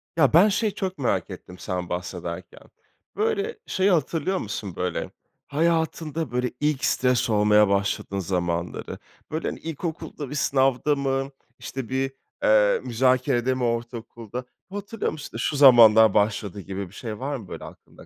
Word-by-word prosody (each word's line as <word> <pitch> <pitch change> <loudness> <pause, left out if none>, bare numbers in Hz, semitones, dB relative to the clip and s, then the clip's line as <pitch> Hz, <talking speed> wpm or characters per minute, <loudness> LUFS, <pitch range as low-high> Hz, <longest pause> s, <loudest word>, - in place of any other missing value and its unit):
Ya, 140 -7 +4
ben 185 +7 +7
şeyi 210 0 0
çok 190 -3 -3
merak 100 - 0
ettim 90 - -10
sen 90 -1 -4
bahsederken, 90 0 -6 0.5
böyle, 440 +1 -1
şeyi 190 +1 +2
hatırlıyor 165 +2 0
musun, 105 - -5
böyle, 90 -2 -3 0.4
hayatında 160 -2 0
böyle 125 0 -1
ilk 150 -2 0
stres 125 -2 +2
olmaya 105 -1 +5
başladığın 100 0 -1
zamanları? 85 -1 -2 0.3
Böyle, 160 +1 -2
hani, - - -4
ilkokulda 160 -2 -5
bir 145 - -5
sınavda 135 +1 +2
mı, 135 0 -1 0.3
işte 130 -4 -6
bir, 135 +1 -1 0.3
eee, 105 -1 +4
müzakerede 125 0 +2
mi 130 -1 -3
ortaokulda? 115 0 -4 0.2
Hatırlıyor 205 +2 -3
musun, 150 -2 -8
işte - - -8
şu 130 +6 -1
zamanlar 110 -6 +8
başladı 105 -1 0
gibi 95 0 -5
bir - - -20
şey 110 -3 -6
var 140 +3 -2
mı 110 -6 -11
böyle - - -8
aklında? - - -14
125 Hz, 150 wpm, -25 LUFS, 105-150 Hz, 0.5 s, zamanlar